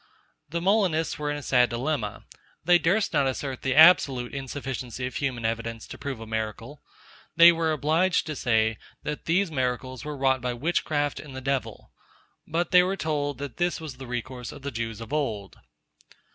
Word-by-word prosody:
The 170 +3 -2
Molinists 185 -6 +1
were 150 0 -2
in 145 - -2
a 145 - -8
sad 125 -3 +3
dilemma. 120 -2 -3 0.4
They 175 0 +6
durst 190 +5 +1
not 140 -3 +3
assert 130 0 -3
the 130 0 0
absolute 140 -6 +6
insufficiency 130 -2 -5
of 130 - -4
human 130 -5 -2
evidence, 115 0 -3
to - - -8
prove 140 -4 -5
a 115 - -7
miracle. 110 +5 -5 0.5
They 170 +1 +9
were 165 -1 0
obliged 160 +4 +2
to 155 - -4
say, 110 -4 +1 0.2
that 150 0 -5
these 175 +2 +1
miracles 130 -2 -2
were 150 -1 -5
wrought 130 -1 +2
by 125 0 -2
witchcraft 145 +1 -1
and 140 -3 -10
the - - -4
devil. 135 0 -3 0.6
But 170 +2 -1
they 180 -1 +8
were 190 +2 -1
told, 145 -4 -2
that 140 -3 -7
this 175 0 0
was 155 -5 -8
the 130 -1 -9
resource 125 0 -5
of 135 - -12
the 140 - -3
Jews 115 -2 -4
of 115 +5 -8
old. 110 -10 -2
140 Hz, 185 wpm, -26 LUFS, 125-155 Hz, 0.6 s, They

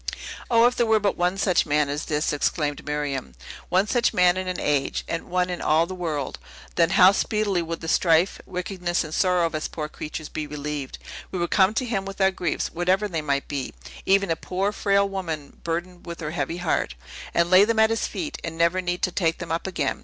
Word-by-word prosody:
"O, 230 -1 +5
if 245 +1 +3
there 235 - +1
were 220 -1 +4
but 205 -1 0
one 180 +2 0
such 185 -4 +2
man 150 0 +2
as 145 +1 -3
this?" 150 0 0
exclaimed 145 0 -1
Miriam. 145 - -3 0.3
"One 185 +3 +3
such 235 +2 +1
man 180 0 +5
in 185 0 -3
an 185 - -2
age, 145 -2 0
and 165 - -3
one 180 0 +1
in 175 - -4
all 160 +2 +3
the 185 - -7
world; 160 -7 -3 0.3
then 165 -1 +3
how 185 0 +9
speedily 205 -3 0
would 165 0 -5
the 165 - -6
strife, 165 +2 +3
wickedness, 180 -1 -2
and 155 -1 -8
sorrow 180 -1 +3
of 165 - -2
us 155 0 -2
poor 150 -2 -5
creatures 155 0 -6
be 155 -1 -5
relieved. 150 -2 -5 0.3
We 185 - -4
would 175 -1 -1
come 195 +2 +4
to 255 - 0
him 200 -5 -2
with 195 0 -7
our 190 0 +4
griefs, 180 -2 -2
whatever 185 +4 +1
they 165 -5 -2
might 140 -2 -1
be, 140 -3 -4 0.3
even 195 -2 +3
a - - +2
poor, 190 +5 -2
frail 200 -1 +2
woman 165 -7 -5
burdened 175 +2 -4
with 170 0 -6
her 155 -1 -3
heavy 165 +1 -2
heart, 165 - -1 0.4
and 170 +1 +2
lay 185 +2 +8
them 225 +1 +1
at 220 0 +5
his 225 - 0
feet, 305 -3 -5
and 165 - -5
never 170 +2 +2
need 175 0 -3
to 185 - +2
take 165 -3 0
them 170 -2 -6
up 165 +3 -1
again. 155 -7 -1
175 Hz, 225 wpm, -24 LUFS, 155-190 Hz, 0.4 s, how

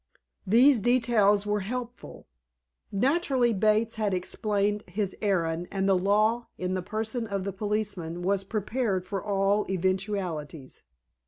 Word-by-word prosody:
These 245 +5 +6
details 220 -4 +3
were 210 0 0
helpful. 245 +4 -6 0.7
Naturally, 260 - +2
Bates 215 +2 +1
had 210 -3 0
explained 205 +2 -1
his 195 +1 -2
errand, 175 -4 0
and 195 0 -1
the 195 - +4
law, 215 +5 +2
in 185 0 -2
the 185 - -1
person 220 +4 -3
of 200 -2 -3
the 195 0 -4
policeman, 195 -4 -3
was 195 +1 +1
prepared 210 -1 -2
for 195 0 -4
all 200 0 +1
eventualities. 185 -6 -3
205 Hz, 130 wpm, -27 LUFS, 190-220 Hz, 0.7 s, These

